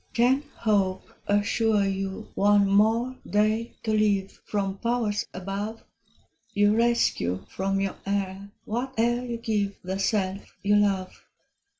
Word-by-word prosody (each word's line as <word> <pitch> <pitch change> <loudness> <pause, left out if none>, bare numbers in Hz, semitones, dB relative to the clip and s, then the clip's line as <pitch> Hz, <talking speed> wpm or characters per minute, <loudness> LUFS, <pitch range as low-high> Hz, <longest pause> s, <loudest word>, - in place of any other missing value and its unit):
Can 250 +4 +3
Hope 195 -4 0
assure 205 +1 +2
you 195 0 -3
one 205 0 +4
more 225 +6 +3
day 215 +2 +1
to 220 - 0
live 205 -2 +2
From 195 -1 -2
powers 230 -3 0
above? 200 +4 -5 0.7
You 205 +1 +4
rescue 230 - +1
from 195 +1 -1
your 195 -1 -2
heir 195 0 -2 0.2
whate'er 240 0 0
you 240 -2 -4
give 210 -3 -1
The 190 +2 -3
self 195 -1 -1
you 205 +1 +3
love. 195 -3 0
205 Hz, 120 wpm, -26 LUFS, 195-225 Hz, 0.7 s, one